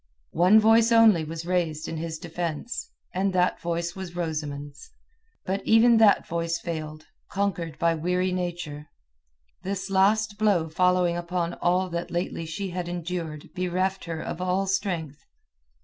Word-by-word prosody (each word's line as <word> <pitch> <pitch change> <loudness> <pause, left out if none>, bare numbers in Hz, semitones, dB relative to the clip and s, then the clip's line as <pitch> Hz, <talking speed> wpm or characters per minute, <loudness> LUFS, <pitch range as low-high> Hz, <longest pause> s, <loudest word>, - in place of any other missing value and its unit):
One 185 +6 +6
voice 225 +1 +5
only 225 -7 +6
was 165 +1 -6
raised 170 -4 -1
in 165 - -4
his 160 0 -4
defence, 175 - -4 0.2
and 190 +1 0
that 180 0 +1
voice 170 0 -2
was 185 -2 -7
Rosamund's. 150 -4 -5 0.6
But 195 +2 -1
even 225 +1 +5
that 220 -2 +5
voice 165 0 -1
failed, 155 -2 -6 0.2
conquered 185 -5 -2
by 170 0 +2
weary 180 +3 0
nature. 175 -5 -4 0.7
This 195 0 -4
last 205 +2 +2
blow 195 -7 +2
following 180 +1 +2
upon 175 0 -2
all 180 +1 +1
that 170 0 -3
lately 170 -1 -3
she 195 +3 -4
had 175 -1 -4
endured 170 -3 -5
bereft 185 +1 -1
her 165 -2 -4
of 165 - -5
all 185 +2 0
strength. 175 -6 -2
175 Hz, 145 wpm, -26 LUFS, 165-190 Hz, 0.7 s, One